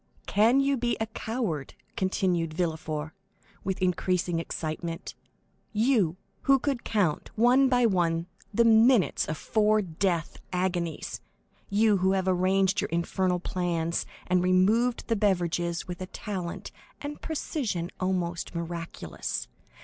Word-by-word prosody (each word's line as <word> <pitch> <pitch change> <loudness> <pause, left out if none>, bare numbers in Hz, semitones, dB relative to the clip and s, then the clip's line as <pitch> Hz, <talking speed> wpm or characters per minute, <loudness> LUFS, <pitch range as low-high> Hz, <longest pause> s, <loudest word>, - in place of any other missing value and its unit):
"Can 225 +6 +4
you 275 0 +2
be 240 0 0
a 220 - 0
coward?" 220 - -3 0.2
continued 180 -4 0
Villefort, 160 -3 -2 0.5
with 190 -1 -2
increasing 180 -1 +1
excitement, 165 0 -4 0.6
"you, 215 -7 +2 0.3
who 275 0 +6
could 270 -2 -2
count, 195 -9 0
one 250 +4 +5
by 245 -1 +4
one, 170 -5 +1 0.3
the 235 +3 +3
minutes 225 -1 +5
of 155 - -3
four 215 +3 +2
death 170 -1 -1
agonies? 180 -3 -2 0.5
You, 210 0 +4
who 190 +1 +2
have 190 -1 0
arranged 190 +2 +2
your - - -3
infernal 180 +2 0
plans, 170 -2 -1 0.2
and 180 0 +2
removed 210 +7 +3
the 230 - +2
beverages 175 -4 0
with 180 0 -6
a 185 - -4
talent 190 -3 -5 0.3
and 295 0 -6
precision 240 - -2
almost 180 -2 -2
miraculous? 170 0 -4
185 Hz, 125 wpm, -28 LUFS, 170-220 Hz, 0.6 s, who